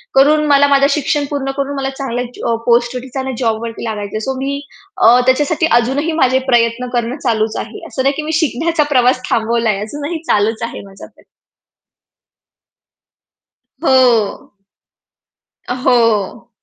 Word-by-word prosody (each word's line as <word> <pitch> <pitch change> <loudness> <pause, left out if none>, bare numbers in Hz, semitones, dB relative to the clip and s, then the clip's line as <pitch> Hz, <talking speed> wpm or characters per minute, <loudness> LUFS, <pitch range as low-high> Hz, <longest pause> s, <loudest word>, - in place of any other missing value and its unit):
करून 300 +3 +4
मला 285 0 +5
माझं 280 0 +4
शिक्षण 295 0 0
पूर्ण 275 -2 -2
करून 280 +1 -2
मला 270 0 -2
चांगल्या 250 -3 -3
ज - - -11
अ, 230 - +1
पोस्ट 240 +1 +2
वरतीच 255 +1 -7 0.2
जॉबवरती 230 -1 -2
लागायचं 210 -3 -5
आहे. - - -1
सो 265 +5 -3
मी 280 +1 -2 0.4
अ, 240 +2 +6
त्याच्यासाठी 295 +5 +2
अजूनही 275 +7 -1
माझे 260 0 +3
प्रयत्न 235 +1 +2
करणं 240 +3 -1
चालूच 220 -4 -1
आहे. 220 0 -11
असं 260 - -4
नाही 275 +1 +2
की - - -1
मी 310 - -3
शिकण्याचा 320 +2 0
प्रवास 250 +1 +3
थांबवलाय 230 0 +1
आहे 195 - -5
अजूनही 295 +8 -5
चालूच 220 +2 +1
आहे 230 - -5
माझा 195 0 -12
प्रयत्न. - - -21 2.6
हो. 245 -10 +2 1.2
हो. 235 -4 +1
250 Hz, 145 wpm, -16 LUFS, 230-280 Hz, 2.6 s, अ